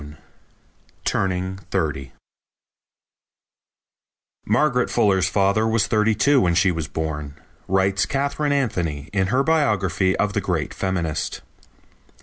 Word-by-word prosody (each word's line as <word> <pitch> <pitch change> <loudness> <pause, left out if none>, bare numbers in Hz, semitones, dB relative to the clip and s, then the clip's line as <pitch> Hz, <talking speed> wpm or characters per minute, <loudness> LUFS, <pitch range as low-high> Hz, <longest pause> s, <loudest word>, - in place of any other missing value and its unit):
_) 75 +1 -11 0.9
Turning 95 0 -1
Thirty 75 -8 -2 2.4
"Margaret 125 +3 +2
Fuller's 95 -5 +2
father 100 +3 +2
was 110 -1 +2
thirty 110 0 +2
two 140 +6 +3
when 85 -2 +2
she 90 +2 +3
was 80 -3 -3
born," 75 -3 -4 0.3
writes 95 -1 +1
Katharine 140 +4 -1
Anthony 85 - -1
in 95 -2 +1
her 130 +6 +2
biography 100 - +1
of 105 -1 0
the - - 0
great - - -2
feminist. 90 -5 -3
95 Hz, 115 wpm, -22 LUFS, 85-110 Hz, 2.4 s, two